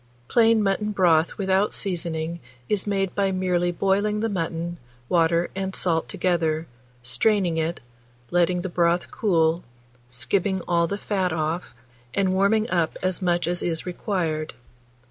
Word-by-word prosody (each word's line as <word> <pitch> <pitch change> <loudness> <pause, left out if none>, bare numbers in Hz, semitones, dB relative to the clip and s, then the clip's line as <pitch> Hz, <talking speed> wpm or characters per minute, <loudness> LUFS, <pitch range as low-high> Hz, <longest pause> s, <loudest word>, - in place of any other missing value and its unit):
Plain 225 -2 +4
mutton 205 +2 0
broth 170 -4 +3
without 195 +1 +1
seasoning 170 -3 -2 0.3
is 210 +4 0
made 195 -2 0
by 195 -1 +1
merely 180 -2 +1
boiling 200 +4 +1
the 225 - 0
mutton, 170 -2 -3 0.3
water, 170 0 +2
and 190 0 -3
salt 165 -8 +1
together, 160 0 0 0.4
straining 175 - +2
it, 165 +1 -1 0.5
letting 175 0 +2
the 190 - -3
broth 175 0 +1
cool, 170 -4 +2 0.5
skimming 185 +9 0
all 170 -1 +2
the 200 - -3
fat 190 -3 -1
off, 160 -1 -2 0.4
and 190 -1 +2
warming 205 +3 +3
up 170 -3 +1
as 185 +1 -1
much 175 -1 +1
as 175 +1 -1
is 165 -1 -2
required. 165 - -2
180 Hz, 140 wpm, -24 LUFS, 165-195 Hz, 0.5 s, Plain